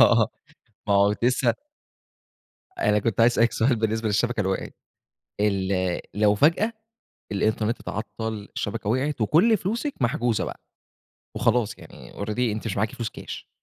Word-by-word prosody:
آه، - - +6 0.6
ما 100 - +4
هو 100 +1 +4
لسه 125 +1 +3 1.2
أنا 105 - +3
كنت 115 +1 0
عايز 120 +1 +6
أسألِك 115 0 +3
سؤال 120 +2 +2
بالنسبة 110 0 0
للشبكة 115 +3 +1
اللي 95 -1 0
وقعت، 95 - -3 0.7
ال 95 -3 +1
لو 105 0 +4
فجأة 170 - +3 0.6
الإنترنت 110 +3 0
اتعطل، 105 0 -5
الشبكة 105 0 -3
وقعت، 130 +2 0
وكل 190 - +4
فلوسِك 235 +9 -2
محجوزة 120 -2 +1
بقى، - - -7 0.8
وخلاص 115 -1 +1
يعني - - -13
already 105 +3 -4
أنتِ 110 -3 0
مش 105 -4 -2
معاكِ 110 +3 0
فلوس 120 -4 -4
كاش، - - -9
110 Hz, 140 wpm, -25 LUFS, 105-120 Hz, 1.2 s, آه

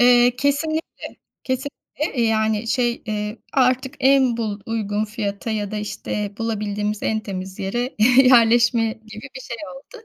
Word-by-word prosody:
Eee, 245 0 +5
kesinlikle, 300 +4 -2 0.3
kesinlikle, 265 0 -3
yani 220 0 +1
şey, 240 -1 0
eee, 210 +1 -3
artık 260 0 +2
en 265 -3 +4
bul 215 -3 -3
uygun 215 -2 -1
fiyata 210 0 -4
ya 210 -2 -2
da 215 - -4
işte 210 -1 -4
bulabildiğimiz 210 -2 -2
en 220 0 0
temiz 190 -2 -6
yere 240 +7 -2 0.3
yerleşme 235 -1 +5
gibi 220 0 -11
bir - - -7
şey 235 -2 -6 0.2
oldu. 445 - -14
225 Hz, 135 wpm, -22 LUFS, 210-250 Hz, 0.3 s, Eee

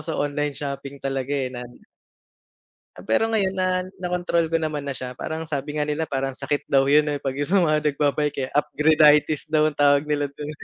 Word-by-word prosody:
sa 160 -1 -3
online 145 0 -1
shopping 140 -1 -5
talaga, 135 -1 -3
eh, 135 -3 -1
na 125 -1 -6 1.3
Ah, 90 - -13
pero 110 - +3
ngayon 195 -3 +1
na, 185 -1 0 0.2
na 180 - -2
kontrol 170 -2 0
ko 165 - +2
naman 155 -2 -3
na 140 - -4
siya. 130 -1 -6
Parang 160 +4 -5
sabi 150 0 -3
nga 150 - 0
nila 150 +2 -1
parang 135 -3 -3
sakit 140 +2 -3
daw 135 -1 +4
'yun, 150 +1 +5
eh, 145 -1 -3
'pag 135 - -1
'yung 145 - -1
sa 190 0 +3
mga 155 -2 +2
nagbabike, 145 0 0
eh. 130 - -4
Upgrade-itis 150 0 +3
daw 155 0 +2
ang 145 - -20
tawag 145 0 +4
nila 150 -1 -1
dun. 150 0 -6
150 Hz, 210 wpm, -23 LUFS, 140-155 Hz, 1.3 s, yun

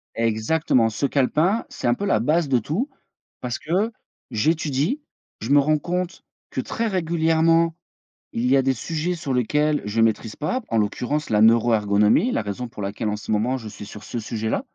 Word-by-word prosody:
Exactement 115 +2 +1
ce 125 +7 -1
calepin, 155 - +1
c'est - - -5
un 120 - +4
peu 200 - -5
la 200 - +2
base 155 0 +1
de 130 - +3
tout 185 - -2 0.5
parce 125 -1 -3
que 190 +8 0 0.4
j'étudie, 155 - 0 0.4
je 110 - -5
me 145 - +6
rends 150 +2 +3
compte 180 +3 -3 0.3
que - - -2
très 230 - -2
régulièrement, 165 -3 +2 0.6
il 120 +2 -1
y 135 - +5
a 135 - +3
des 135 0 +2
sujets 165 +7 -2
sur 155 -6 -3
lesquels 150 +5 +1
je 110 +2 0
maîtrise 110 -1 +1
pas, 250 - -2
en 115 - +2
l'occurrence 125 +8 -1
la 105 -1 +3
neuroergonomie, 110 - +4
la - - 0
raison 105 +4 -4
pour 105 - -9
laquelle 105 +2 -3
en 105 - -1
ce 105 - -6
moment 120 +5 +1
je 110 -3 -8
suis 105 - -9
sur 105 0 -10
ce 120 - -6
sujet-là 110 0 -2
130 Hz, 185 wpm, -23 LUFS, 110-160 Hz, 0.6 s, me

